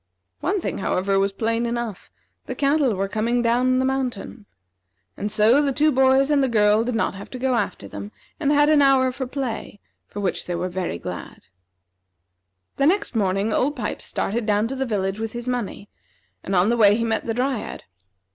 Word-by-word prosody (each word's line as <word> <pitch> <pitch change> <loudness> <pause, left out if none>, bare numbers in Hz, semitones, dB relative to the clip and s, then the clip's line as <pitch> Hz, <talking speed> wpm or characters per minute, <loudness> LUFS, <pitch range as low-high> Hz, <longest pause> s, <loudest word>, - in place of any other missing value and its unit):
One 395 +3 0
thing, - - -4
however, 195 +1 0
was 195 0 +1
plain 230 +3 -1
enough: 235 -4 -4 0.4
the - - -4
cattle 280 -5 +2
were 195 +1 -1
coming 230 +4 0
down 250 +2 +2
the 260 - +1
mountain. 250 -5 -3 0.7
And 205 - -3
so 220 +6 +5
the 285 -1 +1
two 300 +3 +3
boys 265 +1 +3
and 285 -2 +3
the 265 - +1
girl 210 -1 +3
did 245 0 -2
not - - 0
have 195 +1 -10
to 255 - -7
go 260 +1 0
after 235 - -2
them, 100 +1 -8 0.3
and 290 -2 +1
had 290 0 +4
an 305 -1 +5
hour 265 -2 +4
for 260 0 -5
play, 245 -6 -5 0.3
for 205 - -8
which 195 -2 -2
they 175 - -2
were 180 +2 -2
very 180 - -3
glad. - - -8 1.3
The 275 - +3
next 395 -5 +1
morning 200 +1 +1
Old 285 +6 +1
Pipes 220 -6 -4
started 225 +2 -2
down 210 +1 +2
to 270 - -4
the 265 0 -2
village 195 -2 -2
with 225 -1 -4
his 240 +1 -6
money, 240 -5 -3 0.6
and 195 - -2
on 180 +4 +4
the 240 - +1
way 205 -2 +6
he 230 - -1
met 225 0 -1
the 225 - -1
Dryad. 255 -1 -2
235 Hz, 200 wpm, -23 LUFS, 205-265 Hz, 1.3 s, way